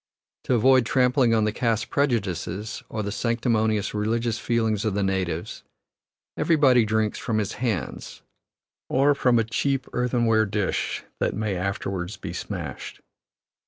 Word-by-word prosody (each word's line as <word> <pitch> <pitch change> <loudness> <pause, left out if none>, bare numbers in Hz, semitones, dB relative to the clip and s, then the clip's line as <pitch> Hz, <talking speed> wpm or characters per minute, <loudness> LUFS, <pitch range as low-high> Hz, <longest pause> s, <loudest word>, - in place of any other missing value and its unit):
To 125 - +2
avoid 130 +1 +4
trampling 125 -2 +3
on 110 - +2
the 105 - +1
caste 115 0 -1
prejudices, 105 - -1
or 110 - -3
the 100 - -3
sanctimonious 110 -2 0
religious 115 +2 -1
feelings 110 -3 0
of 110 -3 -1
the 100 - +1
natives, 95 -4 -2 0.7
everybody 135 -8 +4
drinks 110 0 0
from 115 -3 -1
his 105 -1 -1
hands, 115 -9 -3 0.7
or 140 +3 +4
from 125 -3 +2
a 115 - +3
cheap 130 +4 -1
earthenware 120 -3 +2
dish 100 -1 -2 0.2
that - - 0
may 105 -2 -1
afterward 95 0 -3
be - - -6
smashed. - - -6
110 Hz, 135 wpm, -25 LUFS, 105-125 Hz, 0.7 s, avoid